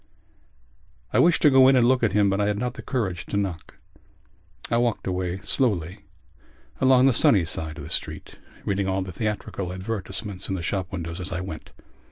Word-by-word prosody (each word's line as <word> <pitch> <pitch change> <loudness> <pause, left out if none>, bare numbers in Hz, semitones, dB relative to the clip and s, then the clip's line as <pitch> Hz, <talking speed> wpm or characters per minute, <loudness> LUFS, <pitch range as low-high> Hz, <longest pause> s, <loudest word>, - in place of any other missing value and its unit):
I - - +3
wished 170 0 +4
to 150 - +7
go 130 -1 +7
in 135 - +6
and 120 -2 +4
look 130 0 +3
at 115 -4 +2
him 105 0 +4
but 100 +1 0
I 100 - +1
had 105 -1 0
not 125 +2 -2
the - - -9
courage 100 -10 -3
to 100 - -2
knock. 95 -5 -4 0.9
I 115 - +3
walked 120 -2 0
away 90 -1 -2
slowly 95 - 0 0.8
along 130 -1 +5
the 135 - +5
sunny 100 -5 +4
side 80 -1 -5
of 75 - -7
the - - -8
street, - - -5 0.3
reading 100 -1 0
all 95 0 0
the 95 - -7
theatrical 105 -2 -3
advertisements 95 0 -4
in 95 - -1
the 85 - -5
shop 95 +1 -3
windows 85 -1 -5
as 90 - -4
I 90 0 -3
went. 80 -4 -7
100 Hz, 200 wpm, -24 LUFS, 90-120 Hz, 0.9 s, to